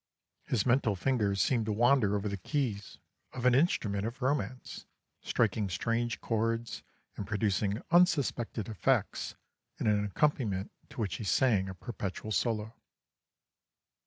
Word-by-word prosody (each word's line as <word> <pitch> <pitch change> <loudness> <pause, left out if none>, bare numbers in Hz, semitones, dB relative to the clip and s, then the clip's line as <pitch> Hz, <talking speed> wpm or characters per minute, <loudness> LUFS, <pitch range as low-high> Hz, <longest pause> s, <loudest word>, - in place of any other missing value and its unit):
His 115 -6 0
mental 120 -4 +3
fingers 100 -2 0
seemed 115 -4 +1
to - - +1
wander 115 -1 +3
over 100 +1 -1
the 100 - -2
keys 105 - -3 0.4
of 125 -1 -5
an 125 - +6
instrument 110 - +2
of 115 +3 -4
romance, 130 -3 -2 0.3
striking 105 -3 0
strange 115 +5 -1
chords 115 +1 -1 0.3
and 100 - -5
producing 105 0 0
unsuspected 140 - +2
effects 110 -4 0 0.4
in - - -3
an 105 -1 +3
accompaniment 105 -3 0 0.2
to - - -11
which 100 -5 -2
he - - -6
sang 100 -2 +2
a 95 - -7
perpetual 105 0 -5
solo. 110 0 0
110 Hz, 130 wpm, -31 LUFS, 100-125 Hz, 0.4 s, an